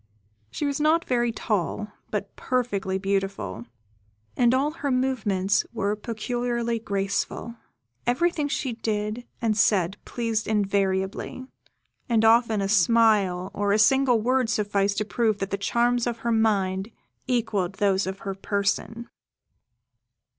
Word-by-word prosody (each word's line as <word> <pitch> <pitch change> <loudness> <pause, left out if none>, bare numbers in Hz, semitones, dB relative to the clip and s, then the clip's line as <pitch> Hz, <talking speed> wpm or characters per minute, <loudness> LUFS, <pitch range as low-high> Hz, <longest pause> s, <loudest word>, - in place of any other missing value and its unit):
She 210 - -3
was 285 +1 -1
not 320 +2 +3
very 240 -2 +1
tall, 210 -1 -2 0.2
but 200 -1 -4
perfectly 205 -7 -1
beautiful, 195 - -2 0.7
and 240 -1 +4
all 270 +4 +2
her 295 -3 -4
movements 220 -7 +1
were 200 +1 0
peculiarly 235 +1 -2
graceful. 200 +2 -2 0.5
Everything 305 +4 +1
she 270 -3 -2
did 220 +1 -3 0.2
and 220 -2 +2
said 195 -2 +2
pleased 230 -2 -2
invariably, 200 +2 -1 0.6
and 225 -2 +3
often 225 -2 +4
a 195 - 0
smile 200 -3 +3
or 205 0 +1
a - - +4
single 250 +2 +4
word 250 +1 +1
sufficed 205 -2 0
to 215 - 0
prove 220 0 +1
that 195 -1 -4
the - - +1
charms 240 +3 +1
of 235 -1 -2
her 235 - +2
mind 200 -3 +1 0.4
equalled 210 -7 0
those 195 -2 +1
of 190 +1 -5
her 195 - -2
person. 200 +4 -2
215 Hz, 130 wpm, -25 LUFS, 195-240 Hz, 0.7 s, and